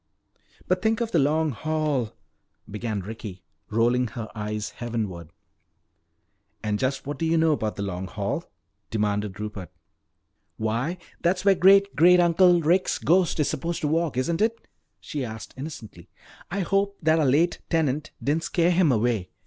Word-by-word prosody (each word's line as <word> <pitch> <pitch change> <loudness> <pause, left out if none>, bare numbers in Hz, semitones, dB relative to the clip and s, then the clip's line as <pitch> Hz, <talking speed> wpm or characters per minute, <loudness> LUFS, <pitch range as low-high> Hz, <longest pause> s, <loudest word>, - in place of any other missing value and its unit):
"But 180 0 +1
think 220 +1 +1
of 235 -1 -2
the 170 - +3
Long 155 +2 +2
Hall 150 -3 -1 0.3
" - - -22
began 105 -1 -3
Ricky, 100 -2 -8 0.3
rolling 120 +3 +2
her 115 0 -6
eyes 105 -1 -4
heavenward. 105 -9 -4 1.3
"And 105 -1 -1
just 135 +2 -1
what 145 +2 -5
do 165 - 0
you 165 +1 +2
know 160 0 +4
about 110 -8 -1
the 100 - -4
Long 95 -1 -4
Hall?" 105 - -3 0.5
demanded 105 -2 -1
Rupert. 105 -5 -6 0.9
"Why, 115 +11 -1 0.2
that's 180 +2 +1
where 200 - +7
dear - - -8
Great 195 +2 +6
great 180 +3 +6
uncle 175 0 +5
Rick's 180 +5 +2
ghost 175 -1 +2
is 145 - +1
supposed 170 +5 -3
to 150 - 0
walk, 160 -3 0
isn't 165 +7 0
it?" 230 +1 0 0.3
she 145 -3 -5
asked 110 -2 -7
innocently. 130 - -9 0.4
"I 195 +2 -2
hope 200 +2 0
that 160 +1 +4
our 155 - +2
late 160 +6 +2
tenant 155 -2 0
didn't 155 +4 0
scare 175 -1 +2
him 175 -4 +3
away. 115 -5 0
145 Hz, 165 wpm, -25 LUFS, 110-170 Hz, 1.3 s, where